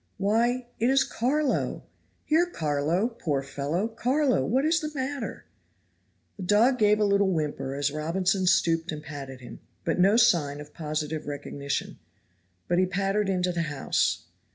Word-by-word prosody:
Why, 235 Hz, +5 st, +1 dB
it 235 Hz, -, +2 dB
is 270 Hz, 0 st, +4 dB
Carlo! 275 Hz, +4 st, -1 dB, 0.4 s
Here, 330 Hz, +3 st, +3 dB
Carlo, 155 Hz, -, 0 dB
poor 155 Hz, -, -2 dB
fellow, 145 Hz, +8 st, -2 dB
Carlo, 255 Hz, -, +1 dB
what 260 Hz, -, +1 dB
is 330 Hz, +1 st, +3 dB
the 305 Hz, 0 st, -4 dB
matter?" 270 Hz, -1 st, -4 dB, 0.9 s
The -, -, -8 dB
dog 225 Hz, +7 st, +3 dB
gave 210 Hz, 0 st, +4 dB
a -, -, +3 dB
little 200 Hz, -1 st, +3 dB
whimper 150 Hz, -4 st, -2 dB
as 145 Hz, 0 st, 0 dB
Robinson 185 Hz, +5 st, 0 dB
stooped 165 Hz, -1 st, +2 dB
and 150 Hz, -1 st, -6 dB
patted 135 Hz, -4 st, -8 dB
him, 125 Hz, -, -10 dB, 0.3 s
but 165 Hz, -, 0 dB
no 195 Hz, +5 st, +5 dB
sign 150 Hz, -10 st, +3 dB
of 150 Hz, 0 st, -11 dB
positive 155 Hz, -1 st, -3 dB
recognition, 140 Hz, -1 st, -4 dB, 0.7 s
but 175 Hz, 0 st, +2 dB
he 185 Hz, -, +3 dB
pattered 195 Hz, +2 st, 0 dB
into 180 Hz, -1 st, +1 dB
the 175 Hz, -1 st, -1 dB
house. 145 Hz, -2 st, 0 dB
185 Hz, 155 wpm, -27 LUFS, 150-230 Hz, 0.9 s, no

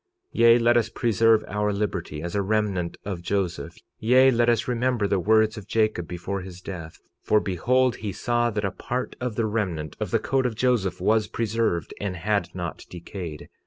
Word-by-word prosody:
46:24 -, -, -6 dB
Yea, 115 Hz, 0 st, +8 dB
let 120 Hz, 0 st, +4 dB
us 115 Hz, -1 st, +1 dB
preserve 115 Hz, -1 st, +3 dB
our 105 Hz, +1 st, 0 dB
liberty 95 Hz, -7 st, -3 dB
as 85 Hz, 0 st, -4 dB
a 100 Hz, -, +1 dB
remnant 100 Hz, -4 st, -1 dB
of 95 Hz, -4 st, -4 dB
Joseph; 95 Hz, 0 st, -2 dB, 0.2 s
yea, 130 Hz, +4 st, +5 dB
let 120 Hz, -1 st, +3 dB
us 115 Hz, -1 st, +1 dB
remember 125 Hz, -2 st, 0 dB
the 100 Hz, -1 st, +1 dB
words 110 Hz, +3 st, +3 dB
of 105 Hz, -, -14 dB
Jacob, 110 Hz, -7 st, 0 dB
before 90 Hz, +3 st, -4 dB
his 90 Hz, -1 st, -9 dB
death, 85 Hz, -4 st, -8 dB, 0.2 s
for 105 Hz, -, +3 dB
behold, 120 Hz, +7 st, +1 dB
he 105 Hz, -2 st, -4 dB
saw 120 Hz, +4 st, 0 dB
that 105 Hz, -2 st, -2 dB
a 100 Hz, -, -1 dB
part 125 Hz, +6 st, -4 dB
of 125 Hz, -4 st, -2 dB
the 115 Hz, -, 0 dB
remnant 90 Hz, -9 st, -2 dB
of -, -, -2 dB
the -, -, +2 dB
coat 135 Hz, -1 st, 0 dB
of 115 Hz, -, -5 dB
Joseph 110 Hz, -7 st, +1 dB
was 110 Hz, 0 st, +2 dB
preserved 115 Hz, -6 st, -1 dB
and 100 Hz, -3 st, -2 dB
had 100 Hz, 0 st, 0 dB
not 85 Hz, -2 st, -5 dB
decayed. 85 Hz, -3 st, -7 dB
105 Hz, 195 wpm, -25 LUFS, 90-115 Hz, 0.2 s, Yea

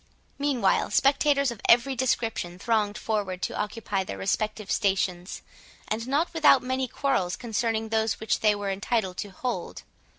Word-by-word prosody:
Meanwhile, 265 Hz, -9 st, +1 dB
spectators 280 Hz, -1 st, +3 dB
of 230 Hz, -, -9 dB
every 255 Hz, +3 st, +5 dB
description 225 Hz, -8 st, -1 dB
thronged 210 Hz, 0 st, 0 dB
forward 200 Hz, -4 st, -2 dB
to -, -, -2 dB
occupy 210 Hz, -2 st, -2 dB
their 100 Hz, -, -7 dB
respective 210 Hz, -, -2 dB
stations, 190 Hz, -3 st, -1 dB, 0.4 s
and 225 Hz, +2 st, -3 dB
not 295 Hz, +7 st, 0 dB
without 315 Hz, -5 st, +5 dB
many 260 Hz, +1 st, -1 dB
quarrels 230 Hz, -9 st, 0 dB
concerning 225 Hz, -1 st, -2 dB
those 220 Hz, 0 st, 0 dB
which 220 Hz, -, 0 dB
they 215 Hz, -1 st, +3 dB
were 200 Hz, -1 st, -3 dB
entitled 195 Hz, -1 st, -1 dB
to 205 Hz, -, -4 dB
hold. 245 Hz, +6 st, -5 dB
220 Hz, 145 wpm, -26 LUFS, 200-255 Hz, 0.4 s, every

